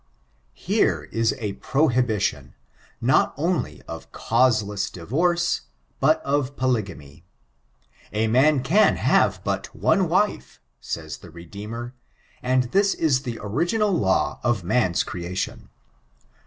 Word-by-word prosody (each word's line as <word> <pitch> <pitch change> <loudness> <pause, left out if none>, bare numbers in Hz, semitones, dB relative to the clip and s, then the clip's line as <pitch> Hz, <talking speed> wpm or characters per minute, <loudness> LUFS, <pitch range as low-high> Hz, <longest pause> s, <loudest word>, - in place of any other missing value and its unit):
Here - - +1
is 115 0 +1
a 105 -5 -3
prohibition, 125 -4 0 0.4
not - - +2
only - - -2
of - - -9
causeless 105 -6 +1
divorce, 170 - 0 0.4
but 155 +4 +3
of 140 -1 -1
polygamy. 95 - -2 0.9
A 110 +1 0
man 130 +4 +3
can 200 +11 +4
have - - +2
but - - -3
one 190 -5 +2
wife, 205 +5 0 0.2
says 80 -2 -5
the 90 - -14
Redeemer; 105 +8 -8 0.5
and 130 0 +2
this 200 0 +3
is 140 -5 +2
the 120 -4 -5
original 175 - 0
law 95 - +1
of 120 -6 0
man's 90 -2 +1
creation. 90 +1 -5
125 Hz, 115 wpm, -24 LUFS, 100-150 Hz, 0.9 s, can